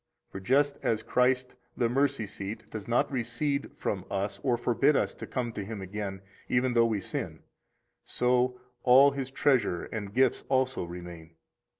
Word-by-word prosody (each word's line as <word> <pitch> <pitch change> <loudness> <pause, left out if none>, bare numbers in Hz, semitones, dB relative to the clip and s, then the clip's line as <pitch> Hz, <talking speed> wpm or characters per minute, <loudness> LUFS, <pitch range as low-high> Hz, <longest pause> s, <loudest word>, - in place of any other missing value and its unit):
For 95 - -6
just 140 +7 +2
as 110 -1 0
Christ, 125 0 +1 0.2
the 120 - +2
Mercy 135 -1 +1
seat, 105 +2 -6
does 105 -3 -6
not 120 +4 +1
recede 140 +3 -1
from 100 -10 -2
us 100 +1 -2
or 125 -3 +1
forbid 120 +5 +2
us - - +1
to - - -9
come 125 -3 -2
to 105 - -5
Him 105 +1 -6
again, 95 0 -5 0.3
even 125 0 +2
though 115 -1 +5
we 110 -3 0
sin, - - -5 0.6
so 125 0 +1 0.2
all 135 +3 +7
His 135 -2 -4
treasure 130 -9 +1
and 105 -3 -5
gifts 130 +3 +2
also 130 -5 +1
remain. 85 -2 -9
120 Hz, 165 wpm, -29 LUFS, 100-130 Hz, 0.6 s, all